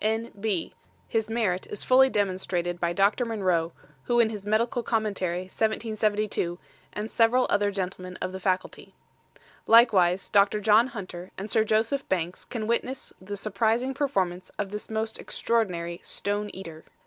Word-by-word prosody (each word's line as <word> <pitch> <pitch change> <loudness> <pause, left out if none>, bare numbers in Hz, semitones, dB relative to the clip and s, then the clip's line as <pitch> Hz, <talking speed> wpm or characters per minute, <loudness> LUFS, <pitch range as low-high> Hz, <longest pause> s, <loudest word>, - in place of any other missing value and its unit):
N. 220 +2 0
B. 200 -5 -1 0.3
His 220 -1 -1
Merit 210 -6 0
is 210 - -4
fully 265 +1 +6
demonstrated 185 -4 -1
by 170 -1 0
Dr. 200 +7 +2
Monroe, 185 -8 0 0.3
who 240 0 +2
in 225 -2 +4
his 205 -2 -7
Medical 230 +3 +1
Commentary, 205 -6 -1
1772, 215 -2 -1 0.3
and 210 +2 -5
several 240 +2 +4
other 205 0 +3
Gentlemen 185 -2 -4
of - - -3
the 190 - -6
Faculty. 185 0 -2 0.7
Likewise 195 -6 +5
Dr. 200 +1 +4
John 215 +3 +5
Hunter 185 -6 -7
and 200 +2 -6
Sir 220 - +4
Joseph 220 +6 0
Banks 175 -1 -2
can 225 -3 -4
witness 235 +3 -2
the 200 +2 -6
Surprising 225 +5 0
Performance 190 - -1
of 200 -2 -3
this 210 0 -6
most 220 0 -3
Extraordinary 175 -7 -1
STONE 205 +1 -2
EATER. 165 -4 -9
210 Hz, 150 wpm, -27 LUFS, 185-225 Hz, 0.7 s, fully